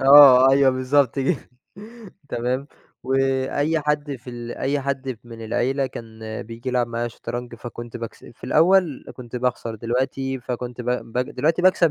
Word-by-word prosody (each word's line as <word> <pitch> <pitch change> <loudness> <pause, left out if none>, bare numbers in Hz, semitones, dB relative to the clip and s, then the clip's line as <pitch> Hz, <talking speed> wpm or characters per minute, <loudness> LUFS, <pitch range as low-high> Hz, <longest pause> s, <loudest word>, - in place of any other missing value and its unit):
آه، 135 -2 +9
أيوه 135 0 +5
بالضبط 130 +1 +2
جه 135 +3 -1 0.8
تمام 125 +3 -2 0.4
وأي 135 +4 +1
حد 150 -1 -1
في 125 +1 -11
ال 120 0 -6
أي 140 +1 -1
حد 135 -3 -3
من 115 -1 -9
العيلة 130 +4 0
كان 110 -3 -7
بييجي 115 +3 -7
يلعب 125 -1 +1
معايا 120 0 -2
شطرنج، 120 +1 -6
فكنت 120 0 -8
باكس 115 -1 -8
في 120 - -13
الأول 165 +1 +3
كنت 125 -1 -7
باخسر 120 -2 -2
دلوقتي 130 +3 -2
فكنت 125 0 -5
ب 120 - -7
ب 125 -1 -2
دلوقتي 150 +7 0
باكسب 185 -3 +5
130 Hz, 150 wpm, -23 LUFS, 120-140 Hz, 0.8 s, آه